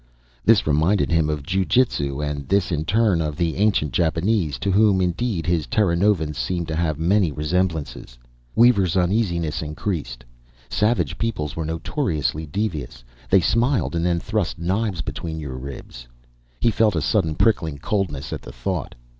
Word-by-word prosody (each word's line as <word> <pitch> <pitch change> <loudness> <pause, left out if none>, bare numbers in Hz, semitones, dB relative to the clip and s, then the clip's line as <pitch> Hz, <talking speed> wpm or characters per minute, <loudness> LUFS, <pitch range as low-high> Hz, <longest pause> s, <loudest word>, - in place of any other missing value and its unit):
This 110 -2 +4
reminded 80 +7 +2
him 80 -2 +2
of 75 -2 -2
ju 95 +5 0
jitsu, 75 - +1
and 70 -2 -4
this 100 -2 +2
in 80 -1 -1
turn 105 -2 +2
of 75 -2 -2
the 85 -1 -1
ancient 100 -8 +1
Japanese 85 - +1
to 100 - -1
whom, 100 -1 +4
indeed, 90 0 -1
his 85 -3 0
Terranovans 85 -5 +1
seemed 85 +7 -2
to 80 - -2
have 80 -3 0
many 90 +1 +2
resemblances. 75 -4 -2 0.4
Weaver's 100 -7 +4
uneasiness 90 -4 0
increased. 75 -6 -4 0.5
Savage 110 +3 +1
peoples 105 -11 -2
were 80 - -3
notoriously 80 - -2
devious 75 - -4 0.3
they 95 -1 +5
smiled 115 - +1
and 85 - 0
then 85 -1 +1
thrust 105 -1 -2
knives 95 +1 -1
between 80 -1 -5
your 70 -4 -6
ribs. 65 -2 -9 0.5
He 115 - +3
felt 110 -3 +2
a 80 - 0
sudden 80 -1 +1
prickling 80 -9 +1
coldness 80 -4 -2
at - - -5
the - - -10
thought. - - -4
85 Hz, 155 wpm, -22 LUFS, 75-100 Hz, 0.5 s, they